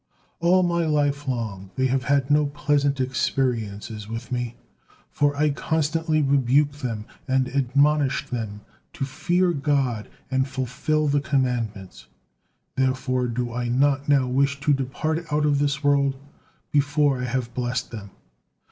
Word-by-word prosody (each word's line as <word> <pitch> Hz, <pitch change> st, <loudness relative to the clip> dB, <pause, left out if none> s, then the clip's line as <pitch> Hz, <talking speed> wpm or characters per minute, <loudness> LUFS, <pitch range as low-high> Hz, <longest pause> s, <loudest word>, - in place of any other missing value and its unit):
All 180 Hz, +2 st, +4 dB
my 170 Hz, -1 st, +1 dB
life 145 Hz, -1 st, 0 dB
long 110 Hz, -7 st, -3 dB
they 130 Hz, -, +1 dB
had 135 Hz, +1 st, +1 dB
no 150 Hz, 0 st, +4 dB
pleasant 145 Hz, -1 st, 0 dB
experiences 115 Hz, -5 st, -1 dB
with 115 Hz, +3 st, -6 dB
me, 120 Hz, -1 st, -2 dB, 0.6 s
for 145 Hz, 0 st, +1 dB
I 150 Hz, 0 st, +3 dB
constantly 160 Hz, +1 st, 0 dB
rebuked 140 Hz, +2 st, +2 dB
them 115 Hz, -5 st, -3 dB, 0.2 s
and 130 Hz, -1 st, +2 dB
admonished 140 Hz, +1 st, +1 dB
them 110 Hz, -4 st, -4 dB, 0.3 s
to 135 Hz, -, -3 dB
fear 175 Hz, +6 st, +1 dB
God 140 Hz, -7 st, 0 dB, 0.2 s
and 130 Hz, +1 st, +1 dB
fulfil 135 Hz, +4 st, -1 dB
the 145 Hz, 0 st, +2 dB
commandments, 125 Hz, -8 st, -2 dB, 0.7 s
therefore 130 Hz, -1 st, 0 dB
do 120 Hz, 0 st, -3 dB
I 120 Hz, 0 st, -2 dB
not 140 Hz, +3 st, +2 dB
now 135 Hz, -3 st, +4 dB
wish 140 Hz, +2 st, +1 dB
to 145 Hz, +1 st, +3 dB
depart 155 Hz, +5 st, -2 dB
out 150 Hz, 0 st, +2 dB
of 145 Hz, -1 st, +2 dB
this 145 Hz, 0 st, 0 dB
world 140 Hz, -1 st, +3 dB, 0.6 s
before 145 Hz, -2 st, +2 dB
I -, -, -1 dB
have 120 Hz, -1 st, -2 dB
blessed 125 Hz, 0 st, -2 dB
them." 105 Hz, -4 st, -8 dB
135 Hz, 140 wpm, -24 LUFS, 125-145 Hz, 0.7 s, All